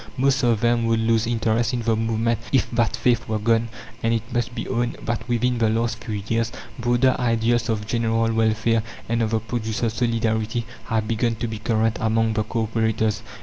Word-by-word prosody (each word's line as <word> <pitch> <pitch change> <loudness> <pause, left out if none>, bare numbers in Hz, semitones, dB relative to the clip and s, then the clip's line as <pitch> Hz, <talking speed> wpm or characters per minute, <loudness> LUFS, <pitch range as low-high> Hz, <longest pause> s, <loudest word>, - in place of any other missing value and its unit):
Most 135 +1 +2
of 115 -3 +2
them 120 -1 +2
would 115 0 +2
lose 115 0 +2
interest 115 0 +1
in 120 - -2
the 115 0 +2
movement 115 +1 0
if 135 - +3
that 115 -1 +1
faith 115 0 +1
were 110 -1 0
gone; 115 +2 +1 0.3
and 115 0 +2
it 115 - -1
must 120 0 -1
be 115 - -4
owned 120 -1 -1
that 115 +1 -3
within 120 0 +1
the 110 -1 +3
last 115 +1 -1
few 105 -4 -4
years 115 0 0 0.3
broader 120 +2 +3
ideals 120 0 +1
of 105 -2 -1
general 115 0 +1
welfare 110 0 +2 0.3
and 115 +1 0
of 110 - +1
the 110 0 +1
producers' 110 0 -2
solidarity 115 -1 0 0.2
have 110 -2 -1
begun 115 +1 0
to 120 +2 -3
be 110 -1 -5
current 110 0 +1
among 110 0 +2
the 110 - +1
co 115 +1 -2
operators. 110 -1 0
115 Hz, 195 wpm, -23 LUFS, 110-120 Hz, 0.3 s, if